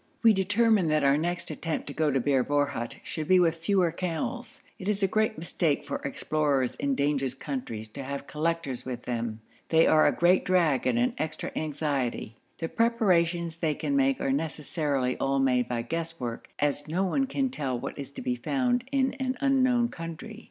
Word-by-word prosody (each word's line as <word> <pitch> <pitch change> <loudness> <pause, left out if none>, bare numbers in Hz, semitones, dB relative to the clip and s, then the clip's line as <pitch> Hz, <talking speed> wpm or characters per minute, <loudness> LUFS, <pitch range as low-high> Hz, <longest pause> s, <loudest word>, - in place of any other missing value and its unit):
We 225 -1 +7
determined 205 -1 +3
that 155 -1 +2
our 140 0 +5
next 170 +3 -2
attempt 165 -2 -3
to 140 - -6
go 155 0 +1
to 135 -1 +1
Bir 135 0 +2
Borhut 145 -5 -1
should 155 -2 -4
be 185 0 +6
with 165 -2 +3
fewer 175 0 +2
camels. 180 +8 -4 0.2
It 185 - -6
is 205 -1 0
a - - +5
great 215 +2 +1
mistake 160 -2 0
for - - -3
explorers 140 -2 0
in 140 -1 0
dangerous 140 -2 0
countries 125 -6 -5
to 135 +5 -7
have 140 +1 -5
collectors 155 -4 -2
with 125 -2 -5
them. 115 -2 -3 0.3
They 160 0 +5
are 155 - +5
a - - +4
great 180 +2 +3
drag 165 -9 +2
and 120 -2 +2
an 120 +1 +2
extra 155 0 -3
anxiety. 140 -7 -2 0.2
The 165 - -3
preparations 175 -8 +1
they 160 -3 0
can 280 - -2
make 275 -1 +2
are 135 - 0
necessarily 145 -3 -1
all 135 0 +1
made 125 -2 +2
by 120 -1 -2
guesswork, 165 -4 -4
as 145 0 0
no 175 +5 0
one 270 +9 +1
can 270 -1 -1
tell 130 - -2
what - - -5
is 140 - -5
to 245 - -7
be 250 -1 0
found 250 -1 0
in 265 -1 +2
an 260 -1 -1
unknown 255 -4 +3
country. 165 +7 -7
160 Hz, 190 wpm, -28 LUFS, 140-195 Hz, 0.3 s, We